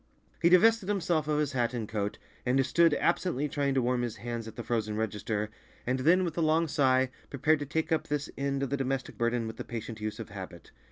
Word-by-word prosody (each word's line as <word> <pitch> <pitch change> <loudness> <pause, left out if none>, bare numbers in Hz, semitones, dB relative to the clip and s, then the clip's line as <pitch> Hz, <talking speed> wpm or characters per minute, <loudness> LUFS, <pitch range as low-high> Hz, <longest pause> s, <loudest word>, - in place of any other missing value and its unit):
He 170 - +5
divested 205 +3 +5
himself 170 -6 +1
of 150 -1 +1
his 150 -2 +1
hat 125 -2 0
and 115 -3 -3
coat, 105 -1 -2 0.3
and 130 +1 +2
stood 165 +2 +4
absently 170 -4 +1
trying 140 -1 0
to 130 - +2
warm 125 0 +1
his 120 -2 -3
hands 115 +1 -5
at 110 - -9
the 120 - -5
frozen 110 -3 -1
register, 105 0 -2 0.3
and 130 +2 0
then 175 +7 +4
with 165 -3 -3
a - - +2
long 160 +1 +3
sigh, 130 -3 +2 0.2
prepared 145 +3 +2
to 145 - -4
take 160 +3 -1
up 160 - +1
this 145 -1 -1
end 140 0 -1
of 135 - -3
the 140 - +1
domestic 135 -1 -2
burden 120 0 0
with 110 - -6
the - - -4
patient 115 -1 -6
use 105 0 -3
of - - -6
habit. - - -9
135 Hz, 230 wpm, -29 LUFS, 115-155 Hz, 0.3 s, He